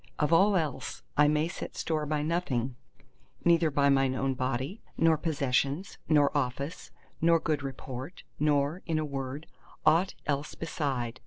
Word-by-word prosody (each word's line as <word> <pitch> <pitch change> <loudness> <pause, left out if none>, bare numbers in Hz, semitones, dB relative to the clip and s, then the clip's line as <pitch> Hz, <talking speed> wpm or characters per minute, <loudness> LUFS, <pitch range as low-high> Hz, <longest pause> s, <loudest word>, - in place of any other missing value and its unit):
Of 150 +2 +1
all 195 +4 +5
else 155 -5 -2
I 150 0 +5
may 150 +1 +2
set 175 - -7
store 155 -2 -1
by 150 0 0
nothing—neither 155 - -1
by 140 -1 +3
mine 135 -1 +3
own 135 0 0
body, 130 - -2 0.2
nor 165 -1 +5
possessions, 145 +1 -1
nor 150 -2 +4
office, 140 +4 -2 0.3
nor 165 0 +5
good 155 -3 -1
report, 135 +2 -7 0.2
nor, 150 +3 +1
in 165 -2 +1
a 155 - 0
word, 140 +1 -5 0.4
aught 165 +5 +4
else 145 0 -2
beside. 130 -7 -3
150 Hz, 145 wpm, -29 LUFS, 135-160 Hz, 0.4 s, all